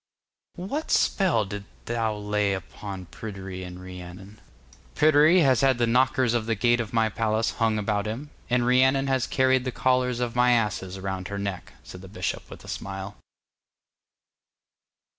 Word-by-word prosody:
'What 275 - -4
spell 170 - +2
didst 100 0 -7 0.2
thou 115 -2 -1
lay 105 -1 0
upon 95 0 -8
Pryderi 95 -2 -7
and 90 0 -8
Rhiannon?' 90 +2 -10 0.5
'Pryderi 155 +4 +5
has 130 -5 +4
had 135 -2 +3
the 120 - +2
knockers 125 +1 +2
of 115 -2 -1
the 115 - +1
gate 120 +3 +2
of 115 -2 -3
my 115 -1 +2
palace 110 +1 0
hung 115 -2 0
about 105 0 -1
him, 130 +7 -5 0.2
and 125 -1 +2
Rhiannon 130 +2 +4
has 130 -2 0
carried 130 -1 +2
the 130 - -2
collars 125 -1 +1
of 120 -1 -2
my 125 0 +4
asses 105 -5 -1
around 95 -1 -4
her 100 - -5
neck,' 100 -2 -5
said - - -11
the - - -10
bishop - - -4
with - - -11
a - - -13
smile. 95 +1 -6
115 Hz, 160 wpm, -26 LUFS, 100-130 Hz, 0.5 s, Pryderi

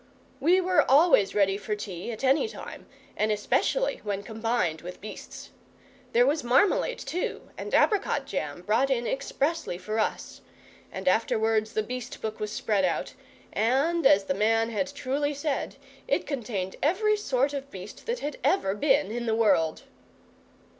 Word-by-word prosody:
We 350 +5 +4
were 370 0 +3
always 280 - +5
ready 195 -1 +3
for 210 +1 -3
tea 195 0 -6
at 220 +3 -7
any 270 - +3
time, - - -9 0.3
and 215 +1 +1
especially 355 - 0
when 200 -1 -3
combined 220 -7 -1
with 180 +1 -8
beasts. 215 - -9 0.6
There 240 +1 +5
was 295 +2 +1
marmalade, 385 - +3
too, 360 - -4
and - - -6
apricot 380 -9 +2
jam, 175 - -4
brought 230 +8 +2
in 240 -3 0
expressly 290 - -2
for 215 +4 -3
us; 215 - -2 0.5
and 190 0 -6
afterwards 220 +2 +2
the 215 - 0
beast 245 +1 -6
book 220 0 -5
was 210 0 -3
spread 205 -2 0
out, 185 - -1 0.4
and, 270 +9 +2
as 195 0 +5
the 190 - -1
man 225 +3 +2
had 230 +6 -1
truly 285 +1 -2
said, 285 0 -2 0.3
it - - +1
contained 210 -9 -4
every 425 +8 +2
sort 275 -8 0
of 280 -1 -5
beast - - -10
that 480 +1 -2
had 295 +1 -4
ever 195 - +2
been 270 +3 +2
in 235 +1 -3
the 220 - +2
world. 165 -8 +2
230 Hz, 160 wpm, -27 LUFS, 210-285 Hz, 0.6 s, always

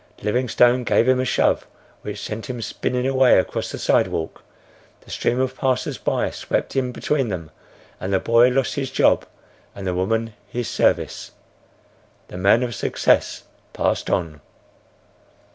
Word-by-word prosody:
Livingstone 125 +2 +2
gave 120 - +2
him 130 0 +4
a 130 - 0
shove 115 - +1 0.3
which - - -6
sent 110 +1 -5
him 125 -1 -4
spinning 125 +2 -2
away 130 -1 +5
across 95 - -1
the - - -5
sidewalk; 80 - 0 0.6
the - - -15
stream 120 - 0
of 130 0 -1
passers 130 -2 -1
by - - -1
swept - - -3
in 130 -2 0
between 135 0 -1
them, 85 -5 -5 0.5
and 95 - -4
the 95 - +3
boy 115 +4 +4
lost 130 +1 0
his 135 -2 -3
job - - +2 0.5
and 100 - -7
the 90 - -1
woman 110 +5 -1
his 120 +3 -4
service. - - 0 1.0
The - - -8
man 100 +6 +4
of 120 -1 -3
success 100 - +1 0.3
passed - - -1
on. 75 -4 -2
120 Hz, 150 wpm, -22 LUFS, 100-130 Hz, 1.0 s, away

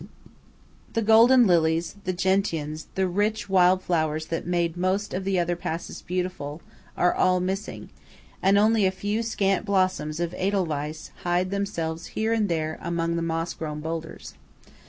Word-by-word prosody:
The 230 - 0
golden 230 +3 +6
lilies, 165 -2 +2
the 185 - +1
gentians, 175 -5 -1
the 190 -1 +1
rich 205 +4 -1
wild 185 -1 +4
flowers 155 -3 0
that 165 - -3
made 170 -2 0
most 185 +3 -1
of 190 +1 -3
the 195 -1 +1
other 175 0 +1
passes 170 -1 -5
beautiful, 180 -5 -4 0.4
are 180 - +3
all 185 0 +3
missing; 190 +3 -4 0.5
and 195 +1 +4
only 215 -1 +4
a - - +1
few 205 +3 -2
scant 195 -4 0
blooms 185 -6 0
of 175 0 -2
Edelweiss 160 -6 -2
hide 180 +1 0
themselves 170 -5 -3
here 220 +1 +1
and 215 -3 +1
there 160 -2 -2
among 170 0 -1
the 170 - -1
moss 165 0 -2
grown 150 -2 -5
boulders. 160 +1 -6
180 Hz, 155 wpm, -25 LUFS, 165-195 Hz, 0.5 s, golden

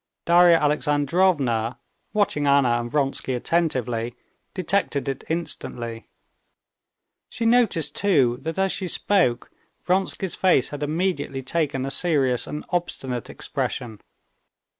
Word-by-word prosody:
Darya 175 0 +6
Alexandrovna, 145 -5 +1 0.3
watching 190 -9 +1
Anna 135 -4 +4
and 120 - -6
Vronsky 135 -2 -1
attentively, 125 -6 -1 0.4
detected 185 -6 0
it 135 - -3
instantly. 120 -9 -4 1.2
She 230 - -4
noticed, 225 - +3
too, 130 -12 +2
that 160 +4 -4
as 190 0 +1
she 190 - -3
spoke 175 -9 +1 0.3
Vronsky's 190 0 -1
face 180 -9 +2
had 145 -1 -7
immediately 155 -3 -2
taken 135 -2 -1
a 135 - -3
serious 140 -6 +1
and 150 - -6
obstinate 135 - -3
expression. 110 -4 -4
150 Hz, 110 wpm, -23 LUFS, 130-175 Hz, 1.2 s, Darya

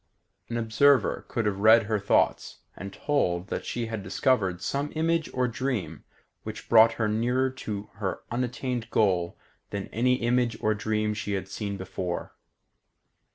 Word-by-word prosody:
An 120 - -2
observer 120 +5 +3
could 115 -3 -2
have 100 -2 -1
read 110 +2 +7
her 110 0 -1
thoughts - - +1
and 95 0 -7
told 95 -9 -1
that - - -4
she 120 -1 -2
had 110 -2 -4
discovered 95 -5 +1
some 140 +10 -2
image 165 0 0
or 125 -1 0
dream 125 -2 -3 0.4
which - - -8
brought 115 0 +7
her 110 -2 -1
nearer 125 +5 +1
to 105 -5 -6
her 95 -3 -3
unattained 125 0 -2
goal 90 -5 +1 0.3
than 100 -1 -5
any 125 +3 +2
image 120 -1 +1
or 110 - +1
dream 110 0 -1
she 105 -1 -4
had 95 -1 -3
seen 100 +1 -4
before. 95 -2 -4
110 Hz, 155 wpm, -27 LUFS, 100-125 Hz, 0.4 s, read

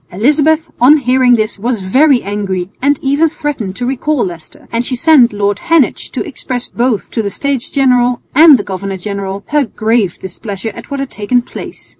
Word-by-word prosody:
Elizabeth 300 - +2
on 280 +5 +7
hearing 255 -2 +3
this 215 -2 -2
was 235 +1 -1
very 255 +7 +3
angry 195 -2 -3
and 285 +2 +2
even 285 +4 +2
threatened 265 -11 -4
to 245 - -4
recall 270 +2 0
Leicester, 170 -4 -10
and 230 +1 -1
she 255 - -2
sent 260 -2 +5
Lord 205 -1 -1
Heneage 330 -5 +1
to - - -4
express 255 -3 -5
both 240 -3 -1
to 225 - -1
the 205 - -2
States 275 +3 -3
General 250 -3 +2
and 305 0 +7
the 205 - -4
governor 195 0 -5
general 200 0 -5
her 295 -1 +2
grave 220 -4 -1
displeasure 195 +3 -6
at - - -11
what 280 -1 -4
had 275 - -5
taken 240 +4 0
place. - - -10
245 Hz, 185 wpm, -14 LUFS, 200-275 Hz, -, on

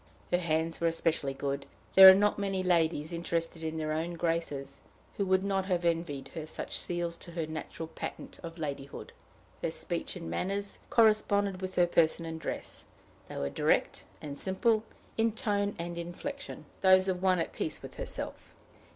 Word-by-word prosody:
Her 175 - +3
hands 165 -1 0
were 170 - +3
especially 160 -4 0
good. 140 0 -3 0.3
There 190 0 +12
are 190 - +10
not 205 +1 +2
many 195 -2 -1
ladies, 165 -3 +2
interested 170 -1 -2
in 160 0 -3
their 155 -1 -2
own 165 +3 -2
graces, 145 -5 -2 0.4
who 200 - +1
would 190 0 +3
not 195 -1 0
have 180 -2 0
envied 165 -5 -1
her 155 -1 -5
such - - -4
seals 175 -1 -2
to 170 - -9
her 165 -2 -2
natural 155 +1 -6
patent 160 - -7
of 170 0 -8
ladyhood. 140 -3 -5 0.5
Her - - 0
speech - - -3
and - - -6
manners 200 - -2
corresponded 205 -4 +3
with 185 0 -4
her 175 - +5
person 170 -1 +2
and 160 0 -5
dress; - - -5 0.4
they - - -6
were 70 - -2
direct - - +1 0.2
and 145 -2 -6
simple, 215 +3 +2 0.4
in 225 -1 +3
tone 205 -3 0
and 170 +1 -4
inflection, 275 +12 -6 0.2
those 185 0 +6
of 180 -1 0
one 185 -1 +4
at 165 - -2
peace - - -4
with - - -9
herself. - - -5
170 Hz, 175 wpm, -31 LUFS, 160-190 Hz, 0.5 s, There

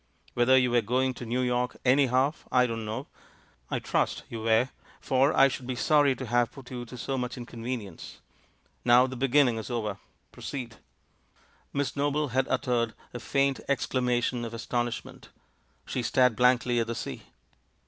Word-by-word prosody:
Whether 120 +2 +4
you 125 -1 +3
were 120 0 +4
going 130 +4 0
to 120 -1 -8
New 125 +3 0
York, 125 0 0
anyhow, 130 +1 +3 0.2
I 125 0 +4
don't 115 -2 -3
know; 110 +1 -4 0.6
I - - -1
trust - - -1
you 115 - -5
w^ere, 115 +3 +2 0.3
for 135 +2 +2
I 135 - +6
should 130 -2 -5
be 130 - -2
sorry 145 +1 +3
to 130 - -6
have 120 0 +1
put 135 -2 -13
you 120 -1 -5
to 125 +2 -10
so 135 +2 -3
much 125 0 -4
inconvenience. 120 -5 -6 0.7
Now 125 +1 +6
the 130 0 -5
be 135 +2 0
ginning 130 -3 +4
is 110 - -7
over 105 -5 -3 0.2
— - - -43
proceed!" 120 -5 -6 0.9
Miss 140 0 -2
Noble 145 +1 0
had 130 +2 +1
uttered 120 -3 0 0.2
a 120 - -5
faint 135 +2 +1
exclamation 125 -3 0
of 115 0 -5
astonishment; 120 +1 -4 0.6
she 130 - -3
stared 125 0 +3
blankly 125 0 +3
at 115 - 0
the 115 - -3
sea. - - -5
125 Hz, 170 wpm, -28 LUFS, 120-130 Hz, 0.9 s, I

